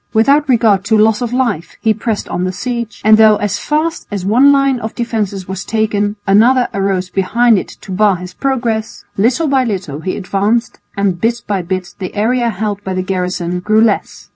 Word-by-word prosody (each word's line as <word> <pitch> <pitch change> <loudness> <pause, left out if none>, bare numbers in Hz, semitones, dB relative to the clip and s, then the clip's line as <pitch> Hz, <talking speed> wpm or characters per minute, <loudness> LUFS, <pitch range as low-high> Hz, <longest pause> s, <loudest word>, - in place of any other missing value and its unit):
Without 280 +6 +3
regard 220 -6 +3
to 220 +2 +2
loss 220 +2 +3
of 240 -2 -2
life 235 -10 -2
he 220 -1 +2
pressed 220 -1 -3
on 180 - -3
the 185 - -1
siege, 235 +3 -5
and 215 0 +7
though 215 -1 +7
as 205 -2 -2
fast 315 +2 -2
as 200 -3 -4
one 250 +8 +5
line 275 -2 +2
of 220 -1 -6
defences 210 -6 -3
was 190 0 -5
taken 210 -1 -1
another 240 +6 +4
arose 195 -2 -1
behind 225 +3 +2
it - - -7
to - - -10
bar 200 +1 +3
his 180 +1 -8
progress, 235 -4 -2
little 245 +10 +1
by 270 -2 +2
little 185 - -4
he 185 +3 -4
advanced 205 +5 -1 0.2
and 195 -3 0
bit 235 +1 0
by 200 -2 -1
bit 185 +1 -4
the 185 0 -6
area 235 +3 +1
held 205 -1 -3
by 190 -1 -4
the 185 - -1
garrison 180 -2 -2
grew 215 +4 +2
less. 220 -3 -1
215 Hz, 195 wpm, -15 LUFS, 190-235 Hz, 0.2 s, and